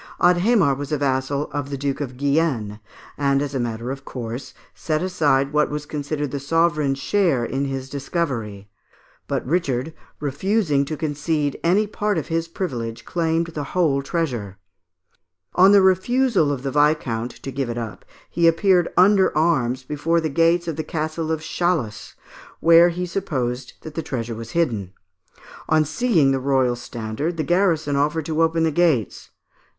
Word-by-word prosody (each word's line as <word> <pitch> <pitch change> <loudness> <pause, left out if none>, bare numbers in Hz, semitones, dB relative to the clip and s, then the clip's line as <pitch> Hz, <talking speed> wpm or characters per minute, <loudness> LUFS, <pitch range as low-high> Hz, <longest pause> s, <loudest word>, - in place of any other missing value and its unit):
Adhémar 180 - +4
was 145 +2 -6
a 150 - +1
vassal 140 +1 -1
of 145 -1 -3
the 140 - -4
Duke 140 +1 -2
of 130 -3 -5
Guienne, 140 -7 0 0.4
and, 140 -1 +2
as 145 0 -3
a 135 - -1
matter 120 +1 -3
of 135 0 -7
course, 125 +1 -7 0.2
set 155 +1 -2
aside 145 -6 +1
what 150 0 +2
was 150 0 -4
considered 145 -1 -3
the 140 - -3
sovereign's 150 -1 +1
share 150 -5 +1
in 135 +3 -2
his 135 -1 -4
discovery; 130 - -3 0.6
but - - -2
Richard, 140 -1 -1 0.3
refusing 150 +1 0
to 155 +2 -5
concede 150 -1 -1
any 190 +6 +3
part 210 -1 -1
of 155 - -3
his 165 0 -1
privilege, 120 -10 -5
claimed 165 -1 0
the 150 - -3
whole 145 -6 +3
treasure. 125 - -3 1.0
On 190 +2 +6
the 200 -1 +6
refusal 190 - +3
of 135 -2 -4
the 135 - -2
viscount 145 -6 +1
to 135 - -5
give 135 -1 -3
it 120 - -4
up 115 -3 -6 0.2
he 170 -1 +2
appeared 175 +1 +3
under 190 -3 +5
arms 135 -6 +1
before 150 +5 0
the 160 -1 -1
gates 165 +3 +2
of 160 -2 -3
the 155 - -2
Castle 155 0 -3
of 160 -1 -1
Chalus, 155 -9 -2 0.4
where 170 +1 +6
he 180 +1 -3
supposed 130 -9 -3
that 155 - -9
the 165 - -3
treasure 120 -6 -4
was 115 0 -8
hidden. 110 - 0 0.8
On 155 -1 +4
seeing 160 - +2
the 135 - +1
royal 130 -2 +1
standard, 120 +7 -4
the 155 - 0
garrison 165 -5 +1
offered 150 +2 0
to 160 +1 -1
open 165 0 +2
the 160 - +2
gates. 155 - +1
150 Hz, 165 wpm, -22 LUFS, 135-165 Hz, 1.0 s, On